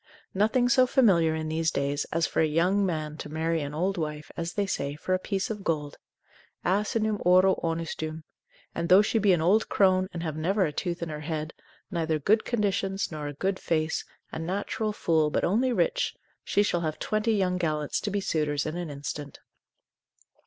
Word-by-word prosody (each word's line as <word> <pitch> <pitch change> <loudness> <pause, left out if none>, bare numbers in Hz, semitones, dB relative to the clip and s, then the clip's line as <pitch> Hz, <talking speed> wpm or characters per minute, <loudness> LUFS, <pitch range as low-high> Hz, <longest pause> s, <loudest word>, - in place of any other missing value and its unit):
Nothing 220 +5 +2
so 255 0 +5
familiar 180 - +4
in 155 0 -3
these 160 +1 0
days, 140 0 -1
as 165 0 +1
for - - 0
a 160 - +3
young 180 +6 +2
man 155 -4 -2
to - - -7
marry 160 +1 -1
an 145 +1 -5
old 185 +3 0
wife, 150 -1 -4
as 170 0 -4
they 205 - 0
say, 140 -6 -2
for 185 +5 -2
a 185 - +2
piece 195 +4 -2
of 210 -2 -5
gold; 150 -4 -2 0.7
asinum 210 +2 0
auro 185 +2 +5
onustum; 160 -1 -3 0.5
and 170 - -3
though 190 +3 +8
she 225 - +1
be 205 -2 +4
an 170 -3 +2
old 205 +6 +3
crone, 185 -1 +3
and 170 -1 -5
have 155 -3 -3
never 185 +5 +1
a 150 - -3
tooth 175 +1 -3
in 165 - -4
her 150 -1 -5
head, 155 0 -4 0.4
neither 160 -3 0
good 210 +9 +2
conditions, 200 -4 -1
nor 150 -2 -5
a 145 - -5
good 190 +5 -1
face, 160 -1 -1 0.3
a - - -5
natural 200 +5 -2
fool, 160 -6 +1
but - - -1
only 240 +8 +2
rich, - - 0 0.3
she 205 - +2
shall 175 -4 0
have 155 -2 -2
twenty 215 +1 0
young 185 -3 +1
gallants 155 -3 -1
to 210 - -2
be 205 0 -1
suitors 150 -6 -1
in 155 +1 -3
an 175 -2 -4
instant. 145 0 -6
170 Hz, 195 wpm, -27 LUFS, 155-200 Hz, 0.7 s, though